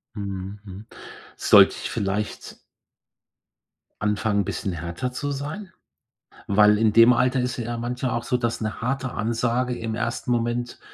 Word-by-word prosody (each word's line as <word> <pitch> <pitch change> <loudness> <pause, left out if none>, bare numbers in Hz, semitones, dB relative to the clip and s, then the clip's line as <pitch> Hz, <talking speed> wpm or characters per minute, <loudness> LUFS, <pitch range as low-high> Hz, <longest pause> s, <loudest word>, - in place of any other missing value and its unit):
Mhm. 100 0 -5
Mhm. 100 +3 -10 0.5
Sollte - - +6
ich - - -4
vielleicht 100 +2 -3 1.4
anfangen, 105 -1 0
bisschen 95 -1 -3
härter 85 +9 -4
zu 145 +3 -3
sein? 155 +8 -5 0.8
Weil 105 +1 +5
in 110 -1 +3
dem 115 +3 +7
Alter 130 +2 +2
ist 125 0 -2
es 115 - -3
ja 120 0 -4
manchmal 125 +2 -3
auch 115 - -5
so, 125 - -1
dass 120 -2 -2
'ne 110 +1 -4
harte 130 +1 -2
Ansage 120 +3 -1
im 115 -1 -4
1. 120 +2 -3
Moment 120 +1 -1
115 Hz, 150 wpm, -24 LUFS, 105-125 Hz, 1.4 s, dem